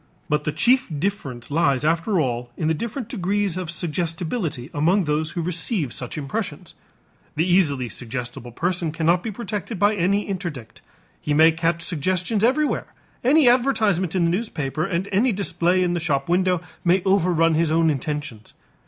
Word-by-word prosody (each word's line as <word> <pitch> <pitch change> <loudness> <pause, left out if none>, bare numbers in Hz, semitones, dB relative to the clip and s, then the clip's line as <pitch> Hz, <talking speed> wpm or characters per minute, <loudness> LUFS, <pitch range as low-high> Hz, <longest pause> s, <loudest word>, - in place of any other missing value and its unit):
But 150 0 0
the 150 - 0
chief 255 - +3
difference 145 -9 -3
lies 145 -3 +2
after 170 +4 +1
all 120 -4 -1
in 155 - -1
the 160 - +3
different 235 - -4
degrees 200 -4 -1
of 185 -3 -4
suggestibility 165 - -3
among 170 +6 +2
those 155 0 -1
who 170 - 0
receive 165 - -1
such 125 +2 -5
impressions. 140 -2 -4 0.6
The 160 +2 +1
easily 155 -9 +2
suggestible 120 +1 -6
person 170 +4 -1
cannot 165 +2 +2
be 225 - -4
protected 210 0 -5
by 205 +3 +3
any 200 +1 +1
interdict; 170 - -6 0.4
he 150 - 0
may 160 +2 +7
catch 165 +1 -1
suggestions 185 +6 -1
everywhere, 290 +5 +1 0.4
any 280 +2 +5
advertisement 220 -8 +2
in 175 -2 +2
the 170 - +2
newspaper 155 - -2
and 185 +1 -2
any 225 +6 +3
display 185 -2 +1
in 175 -1 0
the 175 - -1
shop 140 -5 -1
window 180 0 +2 0.2
may 180 +1 +3
overrun 175 -4 +3
his 160 0 +2
own 165 0 +3
intentions. 145 -6 -5
170 Hz, 160 wpm, -23 LUFS, 150-195 Hz, 0.6 s, may